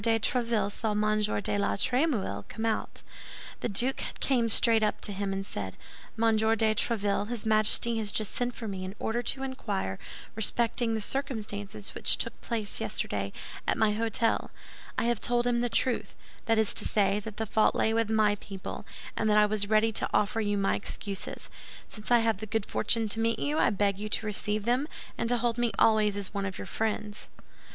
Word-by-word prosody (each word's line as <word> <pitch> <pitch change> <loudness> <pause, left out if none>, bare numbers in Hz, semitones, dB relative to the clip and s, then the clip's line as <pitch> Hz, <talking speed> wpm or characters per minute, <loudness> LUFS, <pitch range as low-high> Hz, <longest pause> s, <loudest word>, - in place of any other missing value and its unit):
de 225 0 +3
Tréville 225 -3 0
saw 215 +1 -2
M. 215 0 +1 0.2
de 205 - 0
la 200 - +1
Trémouille 240 - 0
come 220 - -4
out. 225 -1 -2 0.6
The - - -2
duke 245 +7 +1 0.2
came 240 -4 +1
straight 225 +1 +5
up 210 -1 0
to 210 - -2
him, 200 0 -2
and 195 0 -3
said: 95 - -6 0.4
"Monsieur 220 0 +3
de 220 0 +2
Tréville, 205 -2 0
his 240 -3 -4
Majesty 220 +1 +3
has 210 -2 +1
just 215 -2 0
sent 245 0 -1
for 225 - -6
me 190 -2 -4
in 185 +2 -6
order 235 +2 -1
to 265 +3 0
inquire 205 - -3 0.3
respecting 225 +1 +1
the 220 - -2
circumstances 210 -6 -4
which - - +2
took - - -3
place 220 -4 -1
yesterday - - -2 0.4
at - - +1
my 215 -1 +3
hôtel. 225 +1 0 0.5
I - - +1
have 235 -2 0
told 240 0 +1
him 240 -1 +2
the 245 - 0
truth; 250 +1 0 0.3
that 225 -1 +2
is 220 -2 +4
to - - +5
say, 200 -1 +2
that 210 0 -8
the 220 - -1
fault 215 +1 +2
lay 220 - +2
with 225 -1 +1
my 215 -2 +3
people, 195 -2 -7 0.3
and 220 - 0
that 210 - +4
I 210 - +6
was 205 -1 0
ready 220 +1 +4
to - - 0
offer 210 +2 +1
you 205 -1 0
my 195 0 +2
excuses. 200 -1 -4 0.4
Since 210 -1 -8
I 240 -1 +5
have 225 -3 +2
the 220 - -7
good 220 -1 -1
fortune 225 -1 +1
to 225 - -2
meet 230 0 +1
you, 295 +2 -1
I - - +4
beg 200 -1 0
you 215 +1 -4
to 215 - +1
receive 210 0 -1
them, 250 +5 +1 0.3
and 230 - -2
to 245 - +2
hold 235 0 0
me 240 -1 +2
always 215 -2 +4
as 200 -1 -4
one 200 -1 -2
of 190 - -6
your - - -6
friends." 215 -1 -3
220 Hz, 205 wpm, -29 LUFS, 205-230 Hz, 0.6 s, I